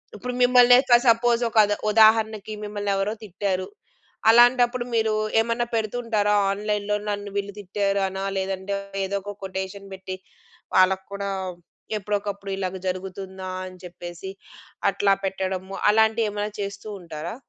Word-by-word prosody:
ఇప్పుడు 250 +5 -5
మిమ్మల్ని 245 0 +7
ఒక 240 -2 +6
సపోజ్ 235 +1 +4
ఒకద 210 -2 +4 0.2
ఉదాహరణకి 220 -1 +4
మిమ్మల్ని 205 -1 -3
ఎవరో 195 +2 0
తిట్టారు. 190 -1 -2 0.6
అలాంటప్పుడు 240 +1 +5
మీరు 220 -1 +2 0.3
ఏమన్నా 230 +1 0
పెడుతూ 220 +1 -1
ఉంటారా 210 -3 +1 0.2
ఆన్‌లైన్‌లో 210 0 -1
నన్ను 205 0 -3
వీళ్ళు 200 0 -2
తిట్టారు 200 0 -1
అనా! 190 +1 -5
లేదంటే 190 +1 -2 0.3
ఏదో 200 +1 -2
ఒక 205 +1 -7
కొటేషన్ 190 +1 -5
పెట్టి 190 0 -6 0.6
వాళ్ళకి 190 0 +4
కూడా 200 0 -3 0.7
ఎప్పుడోకప్పుడు 200 -1 -3
ఇలాగ 190 -1 -3
జరుగుతుందా? 190 0 -5 0.2
అని 185 0 -10
చెప్పేసి 175 +1 -8 0.6
అట్లా 200 0 +2
పెట్టడము, 190 0 -3
అలాంటివి 220 +1 +3
ఏమన్నా 210 +1 -3
చేస్తూ 200 +2 -6
ఉంటారా? 165 +3 -6
205 Hz, 125 wpm, -24 LUFS, 190-220 Hz, 0.7 s, మిమ్మల్ని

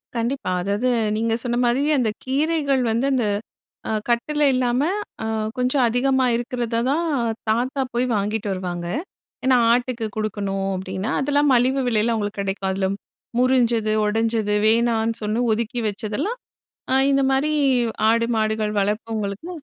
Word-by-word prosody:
கண்டிப்பா. 235 -2 -2
அதாவது 200 +7 0 0.3
நீங்க 225 +1 0
சொன்ன 240 -1 -1
மாரியே 275 +6 +2
அந்த 235 -3 +1
கீரைகள் 280 0 +1
வந்து 230 +4 0
அந்த 250 -4 +1 0.6
அ - - 0 0.2
கட்டுல 295 +6 +1
இல்லாம 250 0 +1 0.4
அ - - -3 0.3
கொஞ்சம் 255 +1 +2
அதிகமா 260 +2 +2
இருக்கிறத 240 -1 -2
தான் 330 +4 0 0.4
தாத்தா 250 +5 0
போய் 240 +1 +1
வாங்கிட்டு 210 +1 -1
வருவாங்க. 175 -2 -4 0.6
ஏன்னா, 260 -1 +5 0.2
"ஆட்டுக்கு 245 -1 0
குடுக்கணும்," 200 -2 -2
அப்பிடின்னா 190 +4 -4
அதெல்லாம் 290 +1 +2
மலிவு 255 +3 +2
விலையில, 225 0 +2
அவுங்களுக்கு 205 -2 -3
கிடைக்கும். 195 0 -3
அதில 190 +1 -1 0.4
முறிஞ்சது, 240 -4 +2
உடஞ்சது, 220 0 0
வேணான்னு 230 0 +2
சொன்ன, 215 +4 0
ஒதுக்கி 235 +3 -2
வச்சதெல்லாம், 220 - -3 0.6
அ - - +5
இந்தமாரி 275 +2 +2 0.6
ஆடு, 230 +1 +2
மாடுகள் 215 -1 0
வளர்ப்பவங்களுக்கு 210 - -2
230 Hz, 130 wpm, -22 LUFS, 210-255 Hz, 0.6 s, ஏன்னா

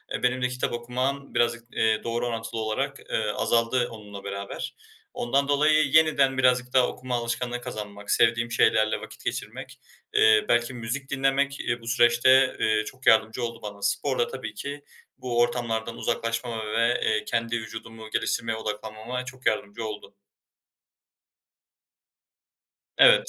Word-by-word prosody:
e, - - -5
benim 125 +1 +1
de 125 - +2
kitap 125 -1 -3
okumam 130 +4 -3
birazcık, 120 0 +1
eee, 110 -1 +1
doğru 120 +1 -1
orantılı 115 -1 -4
olarak, 135 +6 -2
eee, 110 -1 0
azaldı 120 +2 +1
onunla 105 -3 -10
beraber. 100 0 -5 0.4
Ondan 140 - 0
dolayı 155 +2 +4
yeniden 140 -4 +4
birazcık 125 -1 +2
daha 130 -1 +5
okuma 125 -1 -4
alışkanlığı 120 +1 -2
kazanmak, 105 -4 -6
sevdiğim 115 0 +3
şeylerle 110 -1 +3
vakit - - -11
geçirmek, - - -5 0.3
eee, 110 -1 +5
belki 120 +2 +2
müzik 125 +4 -5
dinlemek, 140 0 +1
eee, 120 -1 -2
bu 115 - -12
süreçte, 125 +2 +5
eee, 110 0 +2
çok 130 +3 -10
yardımcı 110 +1 +4
oldu 115 0 -4
bana. 105 -1 -8
Spor 100 - 0
da 475 - +2
tabii 475 - -6
ki 145 +1 -6 0.3
bu 120 -2 -2
ortamlardan 115 -1 0
uzaklaşmama 115 -1 -2
ve, 115 +2 +2 0.2
eee, 110 -1 +1
kendi 115 0 -1
vücudumu 110 0 -9
geliştirmeye 115 0 -1
odaklanmama 110 +3 -5
çok 130 +1 -11
yardımcı 110 +1 -1
oldu. 105 -2 -7 2.8
Evet. - - +7
120 Hz, 140 wpm, -26 LUFS, 110-130 Hz, 2.8 s, Evet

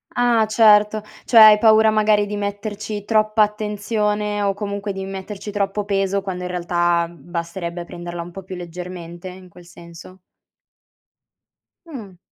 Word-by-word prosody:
Ah, 240 -3 +3
certo. 215 -1 +4 0.2
Cioè 235 - +2
hai 215 -1 +10
paura 220 0 +5
magari 215 -1 +2
di 205 0 -5
metterci 205 0 -5
troppa 215 0 +3
attenzione 210 0 -2
o 200 -1 +1
comunque 200 0 -4
di 190 0 -6
metterci 195 +2 -7
troppo 205 0 -2
peso, 195 -1 0
quando 185 -2 -5
in 180 - -4
realtà, 175 -1 0
mhmm, 170 -1 -17
basterebbe 170 0 -5
prenderla 175 0 -7
un 170 +1 -9
po' 195 - -9
più 185 0 -8
leggermente, 175 0 -8
in 185 0 -11
quel 175 0 -16
senso? 170 +2 -14 1.7
Mh. 225 - -10
200 Hz, 145 wpm, -20 LUFS, 180-210 Hz, 1.7 s, hai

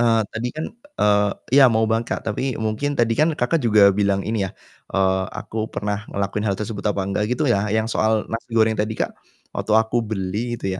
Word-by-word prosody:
eee, 115 -1 +4
tadi 120 +2 -2
kan 155 - -3 0.3
eee, 105 -1 +3 0.3
ya 130 - +8
mau 110 0 +2
banget, 115 +1 0
Kak, - - -6
tapi 130 +2 -2
mungkin 110 +7 -1
tadi 115 -1 +3
kan, 155 +5 +3
Kakak, 135 +6 +1
juga 105 -3 +6
bilang 100 -1 +1
ini 105 -3 -1
ya, - - -11 0.4
eee, 95 -1 +2
aku 110 0 -4
pernah 105 0 -3
ngelakuin 100 +1 -2
hal 100 - 0
tersebut 105 -1 -4
apa 100 -2 -1
enggak 100 +2 0
gitu 150 +5 0
ya? 105 -3 +2
Yang 110 +1 0
soal 110 0 +2
nasi 115 +2 -4
goreng 110 0 +4
tadi, 110 +1 -2
Kak, - - -1 0.4
waktu 110 - -2
aku 110 +2 +2
beli 110 +3 -3
gitu 95 -1 -2
110 Hz, 205 wpm, -22 LUFS, 100-115 Hz, 0.4 s, ya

